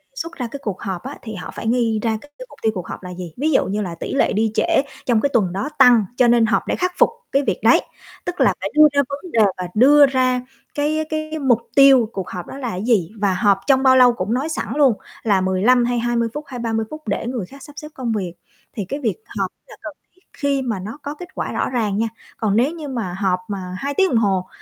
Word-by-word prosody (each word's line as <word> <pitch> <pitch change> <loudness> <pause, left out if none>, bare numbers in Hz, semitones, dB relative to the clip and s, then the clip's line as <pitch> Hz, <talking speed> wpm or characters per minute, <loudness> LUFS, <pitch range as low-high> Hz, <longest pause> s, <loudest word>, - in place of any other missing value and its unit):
xuất 335 -8 -5
ra 250 -3 -3
cái 280 - -6
cuộc 200 -4 -4
họp 190 -1 -4
á, 270 +2 -7
thì 220 -2 -7
họ 175 - -7
phải 225 - -5
nghi 230 -2 +1
ra 225 -2 0
cái 290 - -17
cái - - -8
mục - - -16
tiêu 220 - +2
cuộc 180 - -5
họp - - -8
là 180 - -7
gì? 175 -3 -8
Ví 305 +5 0
dụ 265 - +3
như 205 +3 -2
là 175 -4 -4
tỉ - - -5
lệ 275 - +2
đi 220 +1 +1
trễ 335 +1 +3 0.2
trong 235 -3 +2
cái 285 - +1
tuần 195 -7 +2
đó 200 +10 -3
tăng 240 -5 +7
cho 250 - +5
nên 235 -1 +4
họp 220 - +1
để - - 0
khắc 365 0 -1
phục - - +5 0.2
cái 275 +1 +2
việc - - 0
đấy, - - +6 0.4
tức 355 +1 -3
là - - +4
phải - - -3
đưa 305 0 +8
ra 280 - +4
vấn 285 +5 -7
đề 230 - +1 0.2
và 180 -1 -4
đưa 285 +6 +7
ra 255 -2 +1 0.3
cái 305 +2 0
cái 310 0 -3
mục 255 -5 +3 0.2
tiêu 270 -5 +6
cuộc 190 -2 -5
họp 180 -2 -6
đó - - -8
là 255 -4 -4
cái 185 0 -4
gì? 210 -7 +1
Và 200 -2 +2
họp 200 0 +3
trong 270 -1 +4
bao 260 -1 +6
lâu 250 -1 +6
cũng 205 +1 -2
nói 275 +6 -1
sẵn 310 - -3
luôn 280 -5 +5 0.3
là 200 -4 +2
15 210 +7 +3
hay 245 -1 0
20 235 -1 0
phút 295 - -5
hay 255 -3 -7
30 225 -1 -1
phút 310 0 -8
để 210 +3 -2
người 240 -7 -3
khác 275 +7 -14
sắp 295 - -12
xếp 300 - -7
công 245 -3 -3
việc 190 -5 -2 0.4
thì 205 - -4
cái 280 +10 -4
việc 240 -6 -1 0.2
họp - - -1 0.2
là - - -12
cần - - -7 0.2
thiết 370 - -30
khi 280 -1 0
mà 225 -7 -2
nó 215 +8 -7
có 285 +1 -4
kết 355 +3 -9
quả - - -3
rõ - - -1
ràng 215 -5 -1
nha. 225 - +1 0.3
Còn 210 -2 0
nếu 250 +7 +3
như 325 -3 -7
mà 230 -9 -4
họp 190 -3 +1
mà 185 -3 -5
2 280 +1 -3
tiếng 380 +5 +3
đồng 240 - +2
hồ 190 -4 +1
240 Hz, 270 wpm, -20 LUFS, 205-280 Hz, 0.4 s, đưa